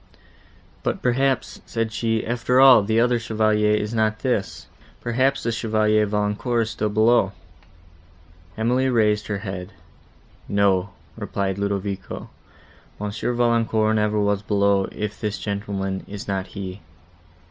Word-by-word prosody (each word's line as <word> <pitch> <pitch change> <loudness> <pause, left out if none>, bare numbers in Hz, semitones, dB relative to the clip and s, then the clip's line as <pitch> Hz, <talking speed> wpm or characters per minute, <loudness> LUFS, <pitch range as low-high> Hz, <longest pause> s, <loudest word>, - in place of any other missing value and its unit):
"But, - - -2
perhaps," 130 +1 0
said 115 -1 -2
she, 115 0 -1
"after 125 +2 +1
all, 135 -4 +8
the 110 +3 +1
other 120 0 +3
Chevalier 110 -1 +2
is 105 +1 -2
not 110 -1 0
this: 95 - -2 0.3
perhaps 130 +3 0
the 115 - 0
Chevalier 110 -1 +1
Valancourt 105 +3 0
is 110 - -4
still 105 0 -1
below." 110 -1 +3 1.2
Emily 125 +4 +1
raised 105 -3 +2
her 105 - -2
head. 95 -1 -6 0.8
"No," 100 -1 +2 0.3
replied 100 -1 -3
Ludovico, 100 -1 -4 0.7
"Monsieur 105 +4 -2
Valancourt 115 -2 +2
never 105 0 +1
was 100 -1 +1
below, 100 -1 +2
if 105 0 -5
this 105 -1 -2
gentleman 100 -2 -3
is 100 0 -8
not 95 -1 -2
he." 95 -1 -7
105 Hz, 125 wpm, -23 LUFS, 100-115 Hz, 1.2 s, all